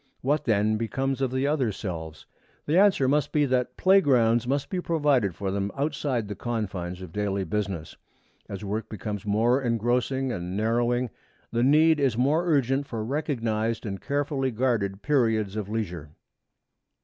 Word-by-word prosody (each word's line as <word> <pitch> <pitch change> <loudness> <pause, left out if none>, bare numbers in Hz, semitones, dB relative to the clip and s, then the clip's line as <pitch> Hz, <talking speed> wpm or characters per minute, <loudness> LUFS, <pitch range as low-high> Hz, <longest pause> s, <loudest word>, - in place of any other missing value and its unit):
What 145 +4 0
then 110 -1 +2
becomes 135 +4 -2
of 135 - +1
the 130 +2 -1
other 140 -6 +1
selves? 80 -6 -6 0.4
The 150 - 0
answer 190 -8 +4
must 145 +1 +1
be 150 -1 +3
that 125 -2 -1
playgrounds 125 -11 +4
must 140 +2 -1
be 185 -2 -1
provided 145 - +1
for 95 +3 -3
them 100 +1 -2
outside 140 -5 -1
the 105 - -4
confines 95 -5 -4
of 90 - -9
daily 100 -2 -1
business. 95 -5 -3 0.5
As 100 +1 -6
work 105 +3 -3
becomes 105 -1 -5
more 115 +6 +2
engrossing 125 +2 0
and 90 -3 -4
narrowing, 120 +2 +1 0.4
the 120 - 0
need 155 +4 +5
is 130 -5 +1
more 150 +8 +2
urgent 140 -2 +1
for 110 -4 -4
recognized 115 -5 -1
and 100 -2 -5
carefully 140 -1 -1
guarded 110 -5 -1
periods 110 -8 +1
of 105 -2 -4
leisure. 90 -9 -4
120 Hz, 155 wpm, -26 LUFS, 105-135 Hz, 0.5 s, need